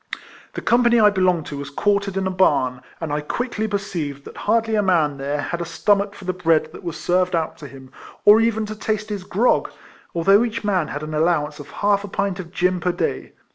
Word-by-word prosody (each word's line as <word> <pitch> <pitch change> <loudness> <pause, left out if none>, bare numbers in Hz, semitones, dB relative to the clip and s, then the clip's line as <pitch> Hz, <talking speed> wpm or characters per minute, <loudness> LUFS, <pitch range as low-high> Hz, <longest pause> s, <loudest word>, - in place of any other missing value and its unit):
The - - -5
company 240 0 +4
1 210 -1 +5
belonged 180 -5 +2
to 145 - -6
was 140 0 -6
quartered 200 +5 0
in 190 - 0
a 190 - 0
barn, 140 -9 +2 0.2
and 160 -3 -4
I 150 - -1
quickly 220 +6 -3
perceived 170 -9 -4
that - - -11
hardly 225 -1 0
a 215 - +3
man 165 -7 +2
there 140 +2 -2
had 170 +3 -3
stomach 200 +4 +1
for 190 - -11
the 185 - -1
bread 165 -3 +1
that - - -11
was 170 -3 -5
served 180 0 +1
out 160 -1 -1
to 150 - -8
him, 130 -2 -13 0.3
or 210 +2 +8
even 225 -1 +1
to 215 +1 -6
taste 215 0 -3
his 205 -3 -4
grog, 210 +7 +1 0.5
although 195 +6 +5
each 230 -2 -3
man 190 -6 +1
had 145 - -5
an 155 0 -6
allowance 150 -2 0
of 145 - -10
half 205 0 +1
a - - -6
pint 195 -1 -2
of 170 -2 -7
gin 180 0 +1
per 180 +1 0
day. - - -3
185 Hz, 220 wpm, -21 LUFS, 155-205 Hz, 0.5 s, or